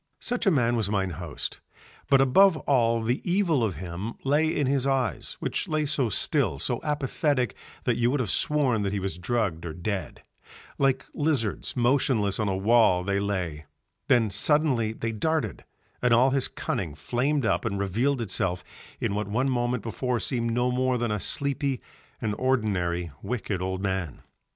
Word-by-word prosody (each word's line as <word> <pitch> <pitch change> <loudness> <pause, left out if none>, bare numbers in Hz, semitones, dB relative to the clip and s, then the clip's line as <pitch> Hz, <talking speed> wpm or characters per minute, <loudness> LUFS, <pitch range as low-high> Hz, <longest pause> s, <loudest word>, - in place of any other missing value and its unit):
Such 245 -3 -1
a - - +8
man 120 -8 +2
was 110 -4 +1
mine 95 -3 0
host; 85 -3 -5 0.5
but 135 -1 +6
above 165 +7 +5
all 115 -6 +2
the 120 +3 0
evil 175 - +2
of 100 -6 -1
him 95 +6 -5
lay 145 +3 +3
in 150 -2 0
his 135 0 +1
eyes, 130 - -1
which - - -2
lay 155 -1 0
so 140 -5 0
still, - - +1
so - - -1
apathetic, 145 -4 0 0.3
that - - +1
you 120 0 +2
would 140 +3 0
have 120 -6 -1
sworn 135 -7 +1
that 100 -1 -1
he 100 - -1
was 95 -3 -4
drugged 100 -5 -1
or 85 -2 -5
dead; 90 - -4 0.6
like 135 -1 +2
lizards 145 -11 -1
motionless 120 -5 +2
on 105 -2 +1
a 95 - 0
wall 100 -3 +4
they 100 +1 0
lay, 90 -7 -3 0.4
then 115 -5 +3
suddenly 125 0 +2
they 115 0 -3
darted, 130 - -1 0.4
and 125 -2 +4
all 130 +3 +4
his 135 -1 +1
cunning 80 -6 -3
flamed 125 - 0
up - - +1
and 100 - -2
revealed 115 +7 0
itself 90 -4 -1 0.4
in - - -1
what 105 0 -2
one 125 +6 0
moment 120 -2 0
before 125 +1 -2
seemed 115 0 0
no 125 +2 +1
more 130 0 +1
than 120 -2 -1
a 105 - -1
sleepy 140 +2 0 0.4
and 105 -2 -1
ordinary 95 -9 0
wicked 105 -6 -3
old 95 +1 -3
man. 95 -7 -3
115 Hz, 175 wpm, -26 LUFS, 100-135 Hz, 0.6 s, a